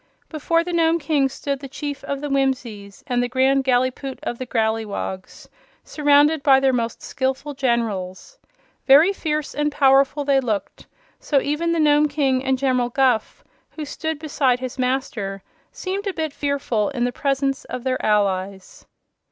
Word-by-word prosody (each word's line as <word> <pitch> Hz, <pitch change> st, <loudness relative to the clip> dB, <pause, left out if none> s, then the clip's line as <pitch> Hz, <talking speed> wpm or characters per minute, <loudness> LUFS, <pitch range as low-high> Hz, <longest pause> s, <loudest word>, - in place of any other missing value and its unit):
Before 330 Hz, +2 st, 0 dB
the 355 Hz, +1 st, -5 dB
Nome 330 Hz, 0 st, +3 dB
King 295 Hz, -4 st, +1 dB
stood 275 Hz, +1 st, -4 dB
the 275 Hz, -, -8 dB
Chief 285 Hz, +1 st, -6 dB
of 280 Hz, 0 st, -4 dB
the 295 Hz, -, -3 dB
Whimsies 250 Hz, -8 st, -2 dB
and 245 Hz, -2 st, 0 dB
the 245 Hz, -, -1 dB
Grand 265 Hz, +2 st, +2 dB
Gallipoot 255 Hz, +1 st, 0 dB
of 240 Hz, -, -4 dB
the 255 Hz, -, -5 dB
Growleywogs, 220 Hz, -5 st, -3 dB, 0.4 s
surrounded 295 Hz, +1 st, +3 dB
by 270 Hz, -2 st, +5 dB
their 270 Hz, -1 st, +2 dB
most 230 Hz, -2 st, -2 dB
skillful 265 Hz, +2 st, -3 dB
generals. 235 Hz, -, -2 dB, 0.5 s
Very 300 Hz, +8 st, +7 dB
fierce 305 Hz, -5 st, -3 dB
and 295 Hz, 0 st, 0 dB
powerful 275 Hz, 0 st, +3 dB
they 275 Hz, -1 st, +3 dB
looked, 220 Hz, -6 st, -4 dB, 0.3 s
so 290 Hz, -, 0 dB
that -, -, +1 dB
even 310 Hz, +4 st, 0 dB
the 335 Hz, -, 0 dB
Nome 300 Hz, 0 st, +4 dB
King 275 Hz, -3 st, 0 dB
and 265 Hz, 0 st, +1 dB
General 255 Hz, -2 st, +1 dB
Guph, 250 Hz, -3 st, 0 dB, 0.3 s
who 310 Hz, -, -7 dB
stood 315 Hz, +2 st, -4 dB
beside 280 Hz, -5 st, 0 dB
his 255 Hz, 0 st, -6 dB
master, 245 Hz, -7 st, -2 dB, 0.3 s
seemed 395 Hz, +2 st, -4 dB
a 390 Hz, -, -1 dB
bit 315 Hz, -4 st, -3 dB
fearful 280 Hz, -8 st, -1 dB
in 255 Hz, -4 st, -2 dB
the 245 Hz, -, 0 dB
presence 275 Hz, +1 st, -1 dB
of 250 Hz, -1 st, -6 dB
their 260 Hz, -1 st, -2 dB
allies. 195 Hz, -2 st, -1 dB
270 Hz, 165 wpm, -22 LUFS, 245-295 Hz, 0.5 s, Very